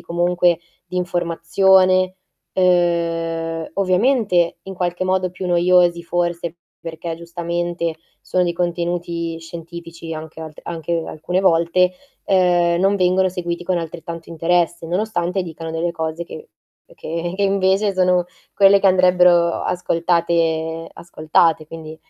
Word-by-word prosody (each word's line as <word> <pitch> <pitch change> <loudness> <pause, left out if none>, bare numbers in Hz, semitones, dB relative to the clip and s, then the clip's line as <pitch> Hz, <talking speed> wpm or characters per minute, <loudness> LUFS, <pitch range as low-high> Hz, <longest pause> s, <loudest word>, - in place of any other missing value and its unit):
comunque 175 0 +1 0.3
di 180 - -6
informazione, 185 +2 +2 0.4
ehm, 165 -2 0
ovviamente 190 -2 +2
in 190 0 -8
qualche 180 0 -2
modo 185 -1 0
più 185 0 -6
noiosi 175 0 +3
forse, 175 -1 -2 0.2
perché 165 0 -6
giustamente 170 0 -3 0.3
sono 185 - 0
di 175 -1 0
contenuti 170 -1 -2
scientifici 165 0 -9
anche 160 0 -9
alt 155 -1 -9
alche 165 0 -3
alcune 180 +4 -2
volte, 180 0 +3 0.3
ehm, 175 -2 +3
non 195 +1 +3
vengono 185 0 +2
seguiti 175 -1 -4
con 180 0 0
altrettanto 165 0 -7
interesse, 170 0 0
nonostante 180 0 -1
dicano 165 -1 -7
delle 170 +1 -2
cose 160 +1 -4
che 455 - -10 0.5
che 170 - -4
che 200 - -1
invece 195 +1 +2
sono 180 -1 +3 0.3
quelle 195 0 +6
che - - +3
andrebbero 180 -2 +4
ascoltate 165 -2 0
ascoltate 160 -1 +1
quindi 160 -1 -9
175 Hz, 120 wpm, -20 LUFS, 165-180 Hz, 0.5 s, quelle